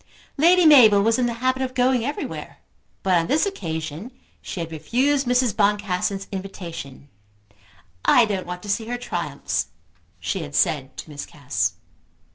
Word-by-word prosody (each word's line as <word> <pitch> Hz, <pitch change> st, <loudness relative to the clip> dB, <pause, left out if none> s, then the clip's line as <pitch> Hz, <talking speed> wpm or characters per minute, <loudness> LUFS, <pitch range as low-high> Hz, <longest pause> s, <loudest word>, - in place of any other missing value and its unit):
Lady 345 Hz, +4 st, +5 dB
Mabel 225 Hz, -10 st, +7 dB
was 225 Hz, +3 st, +2 dB
in 245 Hz, -, +2 dB
the 235 Hz, -, -2 dB
habit 260 Hz, 0 st, +2 dB
of 255 Hz, -1 st, -3 dB
going 250 Hz, -1 st, +2 dB
everywhere, 285 Hz, -, -5 dB, 0.5 s
but 190 Hz, -, +2 dB
on 165 Hz, -1 st, +2 dB
this 305 Hz, +6 st, +2 dB
occasion 165 Hz, -, -5 dB, 0.3 s
she -, -, -6 dB
had 165 Hz, -1 st, -4 dB
refused 255 Hz, -, 0 dB
Mrs. 245 Hz, -3 st, +2 dB
Boncassen's 200 Hz, -2 st, 0 dB
invitation. 170 Hz, -8 st, -7 dB, 1.0 s
"I 245 Hz, -, +5 dB
don't 195 Hz, -4 st, -3 dB
want 180 Hz, 0 st, -6 dB
to 205 Hz, -, -8 dB
see 220 Hz, +2 st, -1 dB
her 245 Hz, +1 st, -3 dB
triumphs," 145 Hz, -, -3 dB, 0.5 s
she 90 Hz, +1 st, -2 dB
had 70 Hz, -, -7 dB
said 135 Hz, -4 st, +1 dB
to -, -, -8 dB
Miss 145 Hz, -1 st, -7 dB
Cass. -, -, -2 dB
205 Hz, 155 wpm, -23 LUFS, 165-250 Hz, 1.0 s, Mabel